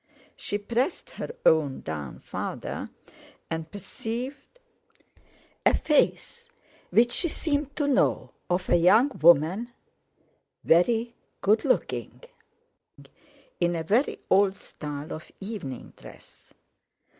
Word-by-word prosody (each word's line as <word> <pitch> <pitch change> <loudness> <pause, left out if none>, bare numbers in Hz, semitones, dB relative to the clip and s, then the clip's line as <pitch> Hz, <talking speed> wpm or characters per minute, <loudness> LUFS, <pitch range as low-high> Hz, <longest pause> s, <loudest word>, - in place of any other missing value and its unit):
She 205 - -2
pressed 235 - -2
her - - -6 0.2
own 150 -4 +3
down 75 -4 -6
further, - - -5 0.6
and 160 0 -3
perceived 235 - -6 1.1
a - - +4
face, 475 +9 +1 0.4
which 240 +2 +4
she 345 - 0
seemed 290 -3 -1
to 295 - 0
know, 280 - +2 0.2
of 180 +1 0
a - - +5
young 205 +11 +5
woman, 170 +9 +5 0.9
very 225 +8 +3 0.3
good 215 +2 +3
looking, 265 - -1 1.4
in 175 0 +1
a 165 - -2
very 220 - +1
old 195 0 +4
style 150 -3 -7
of 160 - -9
evening 195 - -7
dress. - - -15
205 Hz, 105 wpm, -27 LUFS, 165-245 Hz, 1.4 s, a